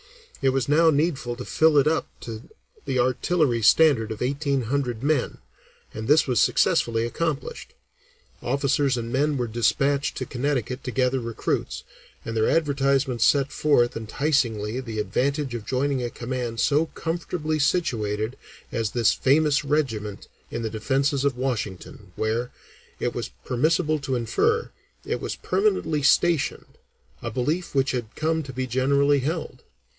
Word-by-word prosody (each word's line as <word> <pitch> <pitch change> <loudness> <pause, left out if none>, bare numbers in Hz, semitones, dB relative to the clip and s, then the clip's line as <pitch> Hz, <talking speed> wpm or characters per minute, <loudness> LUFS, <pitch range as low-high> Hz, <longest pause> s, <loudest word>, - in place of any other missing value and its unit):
It 135 - +3
was 130 0 0
now 160 +3 +5
needful 145 -5 0
to 125 - -7
fill 155 -1 +3
it 140 - +5
up 160 +1 +1
to 115 0 -8 0.4
the 135 -2 -1
artillery 125 +1 +1
standard 120 -3 +4
of 110 +2 -4
eighteen 140 +1 0
hundred 125 -1 -2
men, 145 -3 0 0.6
and 110 0 -6
this 150 +2 +5
was 125 -4 +1
successfully 115 -1 +2
accomplished. 150 +4 -4 0.7
Officers 140 0 +1
and 115 0 -4
men 145 +2 +1
were 125 - 0
despatched 135 +5 0
to 130 - -3
Connecticut 130 -1 -2
to - - -2
gather 130 +1 +1
recruits, 115 -2 -3 0.4
and 115 - -4
their 110 0 +2
advertisements 140 -5 +1
set 140 -1 +3
forth 125 -5 +2
enticingly 115 -2 -1
the 115 -4 -6
advantage 135 +7 -1
of 115 -3 -6
joining 135 0 0
a 120 - -2
command 120 -1 -4
so 150 +3 +2
comfortably 160 -2 -3
situated 115 - 0 0.4
as 115 -3 -1
"this 115 -1 +2
famous 150 +2 +2
regiment" 115 -9 -2 0.2
in - - -4
the 110 - -3
Defences 135 +5 0
of 140 -3 0
Washington, 105 -6 -4
where, 115 +3 -1 0.5
it - - -1
was - - -4 0.2
permissible 155 +4 +1
to 135 -2 -2
infer, 440 - 0 0.3
it - - -2
was - - -3
permanently 390 - 0
stationed, 165 +2 +1 0.4
a 120 - -3
belief 145 +9 -2
which 135 0 +2
had 120 -3 -4
come 160 +1 0
to 135 -3 -8
be 130 +1 -3
generally 140 +3 +2
held. 150 -2 -4
135 Hz, 150 wpm, -24 LUFS, 120-150 Hz, 0.7 s, now